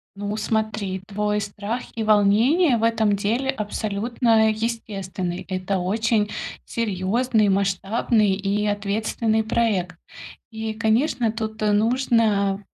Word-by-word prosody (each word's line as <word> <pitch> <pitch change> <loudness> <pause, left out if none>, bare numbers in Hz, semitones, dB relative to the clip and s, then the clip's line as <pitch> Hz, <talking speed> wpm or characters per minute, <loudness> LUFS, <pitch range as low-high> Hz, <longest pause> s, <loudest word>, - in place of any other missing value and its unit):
Ну, 205 +1 -4
смотри, 215 -4 -2
твой 210 0 -1
страх 205 +4 -4
и 225 - -2
волнение 225 - +4
в 225 - -3
этом 220 -3 +2
деле 230 +7 -1
абсолютно 220 0 +1
естественный. 200 -5 -4
Это 185 +1 -1
очень 210 +3 +1 0.4
серьёзный, 220 +1 0
масштабный 200 +2 +1
и 200 +2 -1
ответственный 215 +2 0
проект. 205 -6 0 0.5
И, 220 0 -4
конечно, 230 +1 +1
тут, 220 -1 -5
э, 210 - +3
нужно 215 -3 +2
215 Hz, 110 wpm, -23 LUFS, 200-225 Hz, 0.5 s, волнение